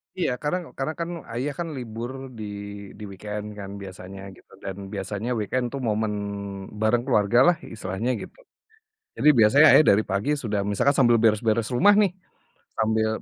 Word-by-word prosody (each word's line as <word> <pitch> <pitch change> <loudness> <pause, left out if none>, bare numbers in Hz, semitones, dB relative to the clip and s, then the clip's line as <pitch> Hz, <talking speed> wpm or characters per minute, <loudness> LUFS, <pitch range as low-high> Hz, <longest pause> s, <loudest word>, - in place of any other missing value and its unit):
Iya, 175 -8 0
karena 150 +5 0 0.2
karena 135 +4 -2
kan 170 - -2 0.2
ayah 135 +5 -2
kan 170 - -2
libur 120 0 -5 0.3
di 110 - -6 0.6
di - - -8
weekend 105 +2 -6
kan 100 -1 -6
biasanya 95 0 -9 0.2
gitu - - -23
dan 95 -1 -4 0.2
biasanya 100 +4 -4
weekend 125 +4 -1
tuh 140 - -3
momen 110 0 0 0.7
bareng 120 +2 +2
keluargalah 120 - +4 0.2
istilahnya 105 +3 -3
gitu. - - -10 0.8
Jadi 150 - +4
biasanya 135 +8 +7
ayah 155 - +8
dari 105 +2 +3
pagi 100 +8 0
sudah 105 -2 -1
misalkan 135 +7 +2
sambil 120 -2 +5
beres-beres 110 +1 +2
rumah 205 +10 +6
nih, 195 -4 +3 0.7
sambil 110 0 +2
110 Hz, 155 wpm, -25 LUFS, 105-130 Hz, 0.8 s, ayah